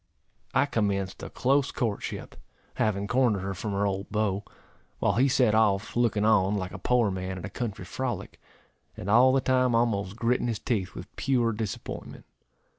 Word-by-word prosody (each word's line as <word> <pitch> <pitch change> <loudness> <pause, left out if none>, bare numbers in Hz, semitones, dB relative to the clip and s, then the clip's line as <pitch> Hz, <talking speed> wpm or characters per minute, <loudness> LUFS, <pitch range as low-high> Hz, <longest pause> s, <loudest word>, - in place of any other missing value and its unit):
I - - +5
commenced 100 -7 -1
a - - -6
close 140 +2 +2
courtship, 110 -5 -3 0.4
having 100 -2 0
cornered 125 -6 +2
her 95 +1 -3
from 100 +3 -4
her 100 +1 +1
old 95 0 -2
beau; 105 -1 0 0.5
while - - +1
he 130 +4 +3
set 130 -5 +3
off, 105 -2 +2
looking 115 -3 +2
on, 105 -2 +4
like 95 -2 -3
a 95 - -8
poor 120 0 +2
man 95 0 -4
at 90 - -6
a - - -7
country 105 -6 -4
frolic, 130 +5 -4 0.6
and 100 - -3
all 125 +4 +7
the 135 0 +3
time 130 -2 +2
almost 105 -5 +1
gritting 120 +1 +1
his 115 -2 -1
teeth 100 -5 -2
with 90 +2 -10
pure 125 -4 +2
disappointment. 105 -2 -6
110 Hz, 175 wpm, -27 LUFS, 100-120 Hz, 0.6 s, all